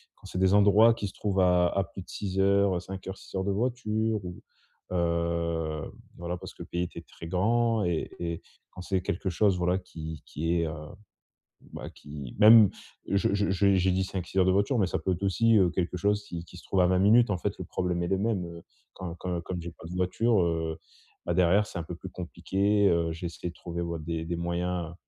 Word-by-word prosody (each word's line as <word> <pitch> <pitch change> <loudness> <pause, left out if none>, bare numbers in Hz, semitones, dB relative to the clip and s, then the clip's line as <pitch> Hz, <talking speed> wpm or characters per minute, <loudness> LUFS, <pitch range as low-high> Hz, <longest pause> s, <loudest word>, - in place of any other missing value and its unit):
quand - - -20
c'est 90 - -4
des 95 +1 +4
endroits 105 +3 +6
qui 105 -3 -4
se - - -15
trouvent 95 -2 0
à 90 -1 +4
à 100 - 0
plus 95 +1 -9
de - - -22
6 95 -1 -3
heures, 100 0 +3
heu, 85 - 0
5 95 +1 -8
heures, 95 - -5
6 - - -12
heures 95 - 0
de 100 - +1
voiture 110 -2 -1
où, 90 -1 -7 0.5
heu, 85 -2 -1 0.3
voilà, 85 +1 -4
parce - - -10
que - - -9
le - - -13
pays 85 0 -2
était 85 -1 -6
très 85 +1 -11
grand 115 +4 +2
et 85 -2 -1
et 85 -1 -3 0.3
quand 90 - -10
c'est 95 0 -1
quelque 95 0 -2
chose 95 +1 +2
voilà 90 +1 +1
qui 80 -4 -8
qui 80 +3 -2
est, 85 -1 +1
heu, 80 - -4 1.0
bah - - -6
qui 70 -4 -9
même 110 -1 +9 0.4
je 100 0 +1
je 100 -1 +1
je 100 +1 +3
j'ai 95 0 +3
dit 95 +1 +1
5-6 95 0 -3
heures 90 - +5
de 95 - +4
voiture, 100 +6 +2
mais 95 - +3
ça - - -1
peut 95 +4 -1
être 90 +3 -6
aussi, 115 +3 +3
heu, 95 -3 +4
quelque 90 0 -2
chose 105 +3 +1
qui 85 -4 -6
qui 90 - -13
se - - -13
trouve 95 - 0
à 90 - +5
20 95 0 +2
minutes, 110 +4 +5
en 95 - 0
fait, - - -2
le - - -5
problème 90 -1 -2
est 85 - -1
le 95 - +1
même, 100 -4 0
heu, 85 0 -10 0.3
quand 85 -2 -6
quand 90 -2 -3
comme 90 0 -5
j'ai 85 0 -6
pas 80 - -14
de - - -7
voiture, 95 +3 +2
heu, 80 -1 -1 0.5
bah, 85 - +1
derrière 95 +4 +4
c'est - - -7
un - - -4
peu 85 +2 -7
plus 95 +1 -9
compliqué, 100 +4 0
heu, 85 -1 +1
j'ai 85 +2 -5
essayé 85 +1 -6
de - - -10
trouver 85 0 -5
ouais, 85 -1 -3
des 80 0 -3
des 85 +1 -2
moyens, 85 0 -2
90 Hz, 240 wpm, -28 LUFS, 85-100 Hz, 1.0 s, même